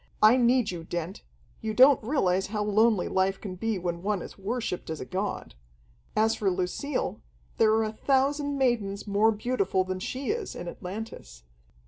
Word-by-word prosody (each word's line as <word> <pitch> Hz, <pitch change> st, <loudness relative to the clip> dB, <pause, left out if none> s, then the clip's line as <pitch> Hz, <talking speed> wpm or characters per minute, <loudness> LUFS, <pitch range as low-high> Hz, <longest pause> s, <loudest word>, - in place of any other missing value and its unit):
I 215 Hz, +3 st, +8 dB
need 245 Hz, -3 st, +3 dB
you, 170 Hz, -2 st, -6 dB
Dent. 175 Hz, +2 st, -5 dB, 0.4 s
You 220 Hz, -1 st, -3 dB
don't 260 Hz, +1 st, +6 dB
realize 195 Hz, -7 st, +1 dB
how 210 Hz, 0 st, -2 dB
lonely 210 Hz, -1 st, +3 dB
life 190 Hz, +1 st, +1 dB
can 195 Hz, -3 st, -6 dB
be 220 Hz, +3 st, -2 dB
when 175 Hz, -1 st, -3 dB
one 200 Hz, -1 st, -1 dB
is -, -, -10 dB
worshiped 200 Hz, -3 st, -3 dB
as 160 Hz, -1 st, -4 dB
a -, -, -5 dB
god. 190 Hz, -, -4 dB, 0.6 s
As 220 Hz, +1 st, +3 dB
for 200 Hz, -, +1 dB
Lucille, 185 Hz, +10 st, -2 dB, 0.4 s
there 220 Hz, -1 st, +5 dB
are 220 Hz, 0 st, +3 dB
a 215 Hz, 0 st, -3 dB
thousand 280 Hz, +4 st, +1 dB
maidens 225 Hz, -7 st, 0 dB
more 210 Hz, +2 st, +3 dB
beautiful 210 Hz, -4 st, 0 dB
than 185 Hz, 0 st, -4 dB
she 260 Hz, -, -3 dB
is, 440 Hz, -3 st, -4 dB
in -, -, -6 dB
Atlantis. 180 Hz, -, -8 dB
210 Hz, 170 wpm, -27 LUFS, 185-240 Hz, 0.6 s, I